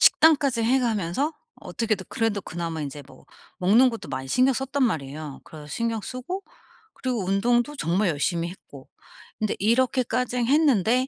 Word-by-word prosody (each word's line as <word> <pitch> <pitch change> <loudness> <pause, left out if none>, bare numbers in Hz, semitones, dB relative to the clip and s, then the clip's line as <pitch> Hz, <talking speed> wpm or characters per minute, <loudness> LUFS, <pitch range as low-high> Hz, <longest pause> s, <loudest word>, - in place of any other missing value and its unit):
식단까지 280 -7 +5
해 260 +3 +3
가면서 225 - 0 0.3
어떻게든 215 -5 -2
그래도 225 -3 0
그나마 165 -3 -5
이제 145 0 -6
뭐 130 -2 -17 0.3
먹는 225 +8 +5
것도 230 - -7
많이 130 0 -5
신경 255 - +3
썼단 270 +2 -1
말이에요. 150 - -2
그래서 150 -2 -11
신경쓰고 240 - -3 0.5
그리고 245 -7 -2
운동도 240 +8 +1
정말 185 +1 +1
열심히 170 +3 0
했고 140 -7 -13 0.5
근데 215 -1 0
이렇게까지 250 +2 +1
했는데 255 - +3
225 Hz, 350 characters per minute, -25 LUFS, 170-255 Hz, 0.5 s, 식단까지